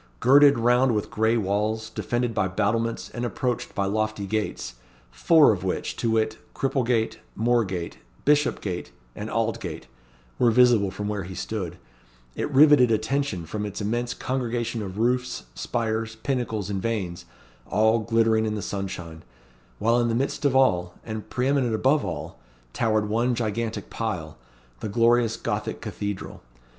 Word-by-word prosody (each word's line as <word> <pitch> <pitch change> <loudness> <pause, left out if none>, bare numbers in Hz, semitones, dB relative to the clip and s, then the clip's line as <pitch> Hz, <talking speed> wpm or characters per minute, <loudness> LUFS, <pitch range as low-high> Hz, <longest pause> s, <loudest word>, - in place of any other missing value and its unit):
Girded 140 +2 +6
round 120 +1 +3
with 105 - -2
gray 110 +2 +2
walls, 110 +2 -1
defended 120 +1 -1
by 95 - +1
battlements, 110 +4 -1
and 120 - -5
approached 125 0 -2
by 100 - 0
lofty 110 0 -1
gates, 105 - -3 0.4
four 140 - +5
of 90 -3 -5
which 95 - -2
to 115 - 0
wit, 110 -1 0 0.2
Cripplegate, 125 -4 0 0.2
Moorgate, 110 -7 0 0.3
Bishopgate, 145 -11 +1 0.2
and - - -5
Aldgate - - -2 0.5
were 120 - +5
visible 115 -4 +5
from 105 +2 -5
where 105 -1 -2
he 95 0 -8
stood; 95 -2 -4 0.6
it - - -2
riveted 145 -3 +6
attention 110 -4 0
from 105 +6 -4
its 105 -2 -5
immense 120 +3 -2
congregation 120 -3 -2
of 95 -1 -6
roofs, 125 +3 0
spires, 110 - -2
pinnacles, 110 -4 -2
and 95 -1 -2
vanes, 95 - -3 0.4
all 110 +3 +3
glittering 115 0 +2
in 105 - -2
the 105 - -4
sunshine; 90 -5 -5 0.6
while 115 +2 +2
in 120 - +2
the 115 - 0
midst 135 +3 -1
of 135 -2 +3
all, 90 -10 +3
and 110 -1 -6
pre 125 +1 -1
eminent 135 -5 +2
above 135 +6 +2
all, - - -5 0.3
towered 110 -2 +1
one 120 +3 +1
gigantic 115 0 -3
pile 90 - -4 0.4
the - - -4
glorious 115 +1 +3
Gothic - - -3
cathedral. 100 -2 -5
110 Hz, 150 wpm, -25 LUFS, 105-120 Hz, 0.6 s, Girded